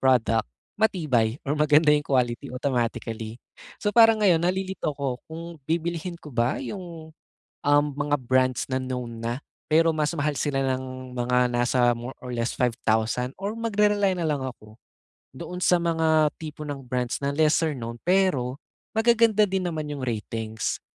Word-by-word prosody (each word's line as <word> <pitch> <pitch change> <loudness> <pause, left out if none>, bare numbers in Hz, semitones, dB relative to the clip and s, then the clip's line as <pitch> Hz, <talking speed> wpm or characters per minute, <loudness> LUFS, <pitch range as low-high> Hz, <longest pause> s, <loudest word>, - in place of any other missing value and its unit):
product 125 -4 +3 0.3
matibay 145 - +1
or 150 - +1
maganda 150 +1 +4
'yong 145 0 +2
quality 125 -1 0
automatically. 115 -3 -2 0.4
So, 205 - 0
parang 225 -2 +7
ngayon 175 -5 +4
nalilito 190 -2 -1
ako 135 -3 -3
kung 160 +1 -7 0.2
bibilhin 170 +2 -2
ko 150 - -11
ba 120 +1 0
'yong, 170 -5 -7 0.6
um, 145 0 +5
mga 145 +1 0
brands 130 -1 +1
na 130 0 0
known 125 -3 -5
na, 120 +2 -2 0.3
pero 165 +1 +4
mas 155 -1 0
mahal 145 +1 0
sila 135 -2 0
ng 130 0 -6
mga 125 0 +2
nasa 120 0 +3
more 120 +3 -7
or 125 -1 -6
less 115 0 -1
5,000 115 0 +1
or 200 +2 -3
magre-rely 210 -3 +2
nalang 155 -5 -1
ako 110 -4 -9 0.6
doon 180 +5 -6
sa 180 - +4
mga 160 -3 +2
tipo 155 -1 -7
ng 145 -2 -5
brands 125 -1 -2
na 140 - 0
lesser-known, 145 -6 +1
pero 170 -9 +2 0.4
magaganda 225 -2 +4
din 190 0 -1
naman 155 -2 -3
'yong 145 - -5
ratings. 110 -1 -3
145 Hz, 150 wpm, -25 LUFS, 125-165 Hz, 0.6 s, parang